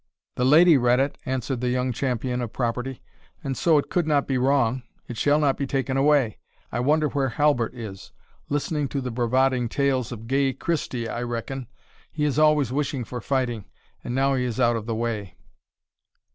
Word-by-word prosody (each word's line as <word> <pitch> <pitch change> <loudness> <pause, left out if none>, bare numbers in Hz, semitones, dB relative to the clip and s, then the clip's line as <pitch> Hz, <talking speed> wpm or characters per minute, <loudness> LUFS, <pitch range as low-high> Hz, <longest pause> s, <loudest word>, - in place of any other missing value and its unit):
"The 125 - 0
lady 160 +3 +7
read 125 +1 +3
it," 140 +1 -1
answered 130 -1 -2
the 125 - 0
young 125 +1 0
champion 125 0 -2
of 120 -3 -4
property; 125 +1 -3 0.4
"and 135 -2 -2
so 160 +1 +3
it 145 - -1
could 175 -3 +1
not 145 -2 +2
be 135 - 0
wrong 130 -2 +2 0.3
it 120 - -6
shall 145 +6 +3
not 145 -3 +2
be 140 - -2
taken 135 -1 -1
away. 135 -5 +2 0.3
I 120 - -2
wonder 150 +4 +2
where 135 -2 0
Halbert 125 -2 +1
is? 105 -5 -8 0.4
listening 145 0 -1
to 140 - -3
the 125 -1 -4
bravading 125 +1 +1
tales 130 -2 0
of 115 -2 -7
gay 135 +2 +1
Christie, 130 -8 -2
I 120 - -4
reckon, 120 +2 -4 0.4
he 150 -1 -1
is 145 0 +1
always 150 -5 +3
wishing 140 -2 -1
for 125 +1 -6
fighting, 120 -5 -1 0.4
and 120 - -4
now 135 +1 +2
he 130 -1 0
is 125 0 -3
out 120 -1 +3
of 110 -1 -5
the 115 - -1
way." 110 -4 -3
130 Hz, 190 wpm, -24 LUFS, 120-140 Hz, 0.4 s, lady